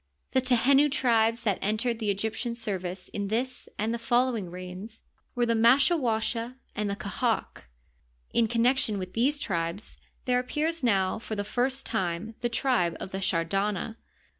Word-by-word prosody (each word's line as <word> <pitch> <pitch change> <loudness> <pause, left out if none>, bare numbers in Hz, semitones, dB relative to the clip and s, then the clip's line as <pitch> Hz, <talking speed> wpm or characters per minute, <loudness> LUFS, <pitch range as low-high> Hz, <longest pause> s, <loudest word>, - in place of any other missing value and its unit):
The 260 - +3
Tehenu 265 +3 +4
tribes 230 -4 +2
that 205 -4 +1
entered 220 +3 0
the 215 -3 -1
Egyptian 220 +4 -1
service 190 -5 -4
in 200 -1 -3
this 245 +5 -2
and 220 +2 0
the 235 - -2
follow 245 +2 +2
ing 195 -6 -4
reigns 185 +5 -8 0.3
were 240 -1 +2
the 230 - +2
Maskawasha 235 -1 +3 0.2
and 210 -1 -1
the 200 - -1
Qahaq, 200 - -2 0.7
In 230 - +3
connection 235 -1 +2
with 185 -1 -5
these 265 +6 +2
tribes 175 -4 -3 0.3
there 250 -1 +3
appears 305 +5 -1
now 195 -4 +2
for 220 -1 -5
the 205 - -2
first 255 +5 -1
time 190 0 -2
the 240 - 0
tribe 230 -9 +1
of 190 - -6
the 190 - -3
Shardana. 195 +4 0
225 Hz, 160 wpm, -28 LUFS, 200-245 Hz, 0.7 s, Tehenu